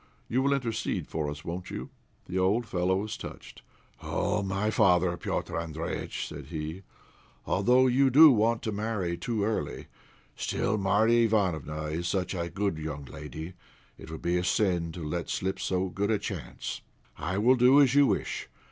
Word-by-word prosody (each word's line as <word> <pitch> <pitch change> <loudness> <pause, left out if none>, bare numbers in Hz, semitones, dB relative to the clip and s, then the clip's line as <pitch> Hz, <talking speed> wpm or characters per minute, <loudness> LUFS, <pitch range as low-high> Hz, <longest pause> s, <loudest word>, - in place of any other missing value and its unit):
You 125 +3 +1
will 140 +1 +2
intercede 120 -5 -2
for 75 -2 -2
us, 75 +1 -8
won't 90 +2 -5
you?" - - -6 0.3
The 95 - -2
old 100 +6 +2
fellow 90 -2 0
was 105 +3 -3
touched. - - -10 0.4
"Oh! 105 - -1
my 100 +2 -1
father, 90 -4 +3
Petr' 85 - -3
Andréjïtch," 80 0 -4
said 75 -2 -9
he, 80 +3 -5 0.6
"although 125 +7 +4
you 130 +2 +4
do 150 +4 +9
want 115 0 +2
to 110 - -1
marry 105 -4 -2
too 110 +3 -2
early, 105 -9 -2 0.5
still 110 +1 -1
Marya 110 +4 +3
Ivánofna 80 -7 -1
is 85 +2 -2
such 95 +1 -1
a 85 -2 -3
good 100 -4 -2
young 75 -2 -5
lady 80 +4 -8 0.5
it - - -10
would 80 - -8
be 90 +1 +1
a - - -2
sin 90 -3 +1
to 85 - -7
let 85 +1 -3
slip 95 +1 -2
so 95 0 -1
good 100 +3 -2
a 110 - +3
chance. - - -5 0.3
I 95 - -3
will 120 +5 +5
do 130 +3 +6
as 135 -3 +5
you 145 -1 +6
wish. - - -2
95 Hz, 175 wpm, -28 LUFS, 85-110 Hz, 0.6 s, do